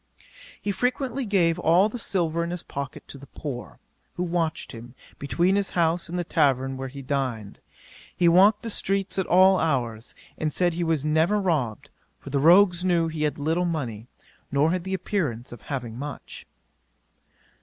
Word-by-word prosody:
'He 205 - -2
frequently 250 +4 -1
gave 175 -4 +2
all 175 +4 +4
the 235 +3 -6
silver 170 -5 0
in 170 - -3
his 175 -1 -5
pocket 140 -1 -7
to 140 - -10
the 140 - -13
poor, 135 -3 -7 0.4
who 180 - -2
watched 170 -2 -2
him, 120 +1 -11 0.2
between 175 +7 +1
his 200 -1 0
house 170 0 +1
and 175 - -3
the 175 - 0
tavern 135 -4 +1
where 135 0 -5
he 135 +1 -9
dined. 130 -7 -3 0.6
He 175 - +3
walked 195 +5 +5
the 230 - -3
streets 195 -1 -1
at 190 - -1
all 185 +1 +5
hours, 120 -8 -2 0.2
and 155 -1 -1
said 175 +2 +1
he 175 +1 -2
was 160 -3 0
never 160 +7 +2
robbed, 150 - -1 0.3
for 140 - -10
the 140 - +1
rogues 175 +3 +5
knew 170 -3 +2
he 155 -1 -2
had 150 - -2
little 160 +5 0
money, 125 -10 -4 0.4
nor 145 +3 +3
had 180 0 -2
the 190 0 -1
appearance 155 - -3
of 120 - -10
having 125 -4 -5
much. 145 -1 -8
165 Hz, 175 wpm, -25 LUFS, 140-185 Hz, 0.6 s, walked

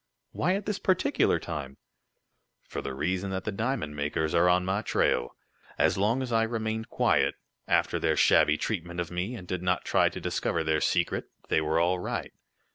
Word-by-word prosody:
"Why 185 - +1
at 200 0 -4
this 205 -1 -2
particular 185 -2 +2
time?" 70 -5 -6 0.9
"For - - -6
the 70 - -5
reason 90 +7 -1
that 95 0 -3
the 105 - -2
diamond 110 - -2
makers 75 +2 -1
are 85 +1 +4
on 90 0 +3
my 95 +3 0
trail. - - 0 0.4
As - - +3
long 110 +7 +1
as 125 - -5
I 115 -1 +3
remained 110 -1 -2
quiet, - - +2 0.3
after - - +2
their - - +1
shabby 75 0 +5
treatment 85 -4 -3
of 85 -1 -3
me, 90 +7 -3
and 90 -6 -9
did 90 -1 -3
not 90 0 0
try - - +3
to - - -7
discover 85 -1 -1
their 80 -1 +1
secret, - - 0 0.2
they 80 - +3
were 80 +1 +1
all 90 +2 +2
right. 90 - -4
90 Hz, 190 wpm, -28 LUFS, 80-110 Hz, 0.9 s, shabby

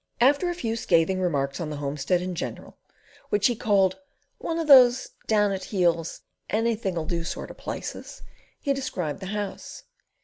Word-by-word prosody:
After 285 +8 +4
a 350 - -2
few 230 -9 -2
scathing 185 -3 +2
remarks 140 -5 -1
on 160 - -3
the 150 - -4
homestead 145 +5 -1
in 185 0 -3
general, 175 - -6 0.5
which 205 -1 +1
he 240 - +4
called 195 -2 +2 0.4
"One 330 - -3
of 330 - -1
those 260 -3 +7 0.2
down 210 -2 +3
at 190 -1 -3
the - - -8
heels, 170 -4 0 0.3
anything 215 -4 0
'll 160 - -2
do 170 +1 -2
sort - - -5
of - - -13
places," - - -7 0.4
he 280 - 0
described 185 - -3
The 190 - -7
House. 205 0 -5
190 Hz, 175 wpm, -26 LUFS, 170-230 Hz, 0.5 s, those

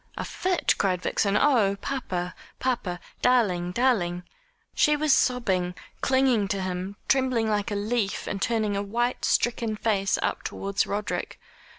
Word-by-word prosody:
"A - - -3
fit!" 365 -1 +1
cried 185 -3 +1
Vixen. 200 0 +1
"Oh, 210 -7 +3
papa, 185 -11 -3 0.2
papa 235 -9 -2 0.2
darling 195 -9 +2
darling 180 -7 +1 0.3
" - - -41
She 300 - +4
was 300 -1 +3
sobbing, 190 -10 +1 0.3
clinging 260 -6 +3
to 195 0 -2
him, 185 +2 -4
trembling 255 -4 +2
like 210 -2 0
a 205 - -2
leaf, 210 0 -1
and 195 - -4
turning 220 -2 0
a 200 - 0
white, 240 +5 -1
stricken 230 -2 +1
face 200 -3 +1
up - - -1
towards 200 0 -2
Roderick. 205 +1 -3
210 Hz, 150 wpm, -26 LUFS, 195-250 Hz, 0.3 s, She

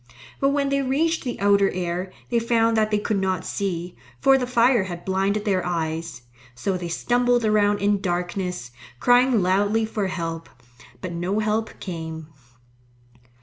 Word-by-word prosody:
But 275 - +3
when 280 0 +1
they 275 0 +1
reached 310 +5 0
the 245 -3 -4
outer 200 -1 +4
air, 180 +1 -3 0.2
they 235 - +3
found 230 -1 +2
that 215 -1 +2
they 210 - +2
could 205 -1 -1
not 185 -2 -1
see, 180 -3 -3 0.2
for 270 - +5
the 255 -2 0
fire 240 -3 +3
had 175 -2 -7
blinded 195 +2 0
their 190 -3 +1
eyes. 160 -5 -3 0.3
So 185 +11 -1
they 175 -1 -4
stumbled 245 +6 +1
around 205 -1 +3
in 200 -1 +2
darkness, 180 -6 -3 0.3
crying 245 - +4
loudly 205 +4 +2
for 215 -2 -2
help. 165 -3 -4 0.5
But 185 - -5
no 175 +4 -2
help 215 +1 -1
came. 160 -3 -6
200 Hz, 155 wpm, -23 LUFS, 180-230 Hz, 0.5 s, for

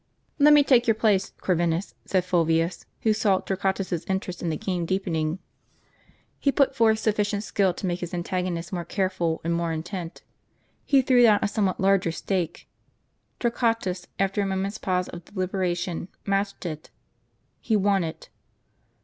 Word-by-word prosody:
"Let 295 +1 +7
me 290 - +6
take 250 -4 +4
your 225 - +4
place, 210 -3 +2
Corvinus," 175 0 0
said 185 -2 +1
Fulvius, 165 -1 +1
who 220 - +3
saw 210 -3 +2
Torquatus's 190 -3 -2
interest 190 -2 -3
in 175 - -1
the 155 - -1
game 180 -3 -2
deepening. 165 -3 -1 1.0
He 280 - +2
put 275 -1 +2
forth 220 -1 +4
sufficient 210 -1 0
skill 195 -3 +1
to - - -5
make 175 -1 -1
his 175 -1 -5
antagonist 175 0 -3
more 175 -2 -2
careful 175 -2 -1
and 170 +1 0
more 170 0 -1
intent. 170 +2 -5 0.6
He 275 -2 +5
threw 250 -1 +4
down 220 -3 +7
a - - +3
somewhat 200 -3 0
larger 190 -3 +3
stake. 175 0 -3 0.7
Tor 235 - +1
quatus, 225 -7 -1
after 195 +1 +1
a - - 0
moment's 195 +2 -2
pause 180 -1 0
of 175 0 -9
deliberation, 180 -3 -2 0.2
matched 200 -1 -1
it. 155 -3 -6 0.7
He 220 - 0
won 200 -2 +2
it. 160 -1 -7
190 Hz, 160 wpm, -25 LUFS, 175-205 Hz, 1.0 s, Let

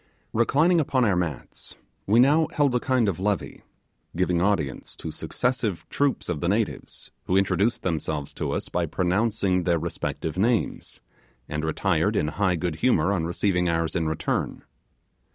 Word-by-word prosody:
Reclining 155 +9 +3
upon 130 -3 +1
our 100 -4 +2
mats, 85 -6 -4 0.3
we 110 +4 +4
now 150 +5 +5
held 145 -3 +2
a 125 - +2
kind 130 -3 +1
of 95 -4 -1
levee, 100 +1 -2 0.5
giving 90 -1 +1
audience 95 -8 -1
to - - -6
successive 120 -7 -2
troops 140 -1 0
of 75 - -2
the 85 - 0
natives, 105 +1 -2
who 95 - +2
introduced 100 +4 +1
themselves 80 -4 -2
to - - -3
us - - -3
by - - -1
pronouncing 95 0 +1
their 85 -1 +1
respective 80 0 -4
names, 115 +2 0 0.5
and 75 +1 -3
retired 85 +5 +1
in 75 - +1
high 95 +1 +1
good 85 -2 -2
humour 95 -4 +2
on 85 -5 -1
receiving 90 0 +1
ours 80 0 -1
in 80 -3 0
return. 80 - -2
95 Hz, 155 wpm, -25 LUFS, 85-115 Hz, 0.5 s, now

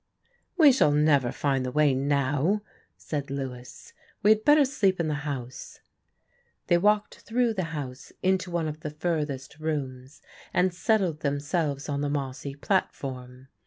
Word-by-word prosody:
"We 310 -5 +8
shall 250 - +4
never 145 -4 +3
find 135 -2 0
the 125 - -3
way 150 0 +3
now," 145 +8 +1 0.3
said 145 -3 -4
Lewis. 130 -3 -7 0.3
"We 210 - +6
had 215 0 +3
better 295 +1 +6
sleep 200 -9 +1
in 165 - 0
the 150 -1 -3
house." 130 -3 -7 0.9
They 175 -1 +3
walked 210 +2 +1
through 235 0 0
the 190 -4 -2
house 140 -5 -7
into 185 -1 +1
one 170 -2 -1
of 155 0 -5
the 155 - -5
furthest 150 -3 -3
rooms 135 -4 -4 0.3
and 180 0 +3
settled 180 -4 +1
themselves 145 0 -1
on 140 -1 -2
the 145 - -1
mossy 140 -1 -4
platform. 130 -6 -3
150 Hz, 150 wpm, -27 LUFS, 135-180 Hz, 0.9 s, We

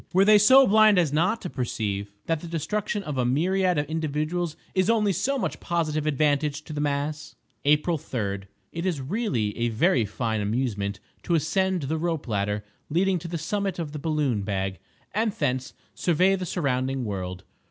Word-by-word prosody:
Were 190 +2 +5
they 210 0 +7
so 260 +6 +8
blind 215 -1 +6
as 165 -5 +2
not 185 +9 +2
to - - -3
perceive 100 -5 -3
that 165 -1 0
the 170 - -8
destruction 200 +6 -2
of 150 -6 -3
a - - +3
myriad 180 +8 +2
of 145 - +1
individuals 155 +2 -2 0.2
is 185 +1 +2
only 210 -3 +3
so 255 - 0
much - - -2
positive 155 -3 -1
advantage 150 0 +1
to 155 - -8
the 145 - -2
mass! 145 +1 -2 0.3
April 150 +3 +3
3.—It 100 - -5
is 180 -6 -1
really 130 - -1
a 120 0 +1
very 120 - +2
fine 110 +1 -2
amusement 105 -2 -1 0.2
to 170 - 0
ascend 185 +2 +1
the 155 +4 -1
rope 165 -4 -2
ladder 105 -1 -1 0.3
leading 185 +3 +2
to 170 - -7
the 170 0 -3
summit 195 +4 -2
of 165 -4 -4
the 150 - -6
balloon 145 -8 0
bag, 95 -1 -2 0.3
and 220 +1 +1
thence 130 -5 -2 0.2
survey 180 +3 +3
the 185 -1 -4
surrounding 130 -5 -1
world. 90 -3 -4
155 Hz, 175 wpm, -26 LUFS, 125-180 Hz, 0.3 s, so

